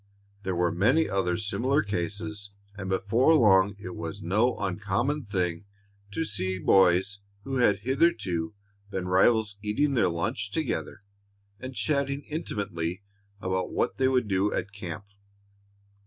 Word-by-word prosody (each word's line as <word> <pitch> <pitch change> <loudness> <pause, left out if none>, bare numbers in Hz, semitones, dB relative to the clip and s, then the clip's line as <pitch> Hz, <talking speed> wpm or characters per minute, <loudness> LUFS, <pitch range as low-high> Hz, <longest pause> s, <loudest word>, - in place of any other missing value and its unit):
There 95 -2 -2
were 85 0 +2
many 125 - +3
other 90 -3 0
similar 130 +8 0
cases, 100 +2 -3 0.3
and 95 -2 -6
before 115 +11 +3
long 100 -6 +5
it 90 -3 -8
was 85 +4 -5
no 110 +7 +1
uncommon 105 +9 -1
thing 90 -3 -2 0.4
to 160 +11 -2
see 95 -4 -2
boys 95 +2 +3 0.2
who 135 +2 -3
had 105 -6 +3
hitherto 110 - +1 0.3
been 95 -2 -3
rivals 100 +3 +3
eating 110 +8 +1
their 120 - +3
lunch 85 0 -2
together - - -3 0.6
and 130 0 -7
chatting 140 -1 0
intimately 100 - -4 0.4
about 95 -1 -1
what - - -1
they 130 - +3
would 125 -4 +2
do 100 +1 +1
at 100 - -3
camp. 100 0 -7
100 Hz, 135 wpm, -27 LUFS, 95-120 Hz, 0.6 s, long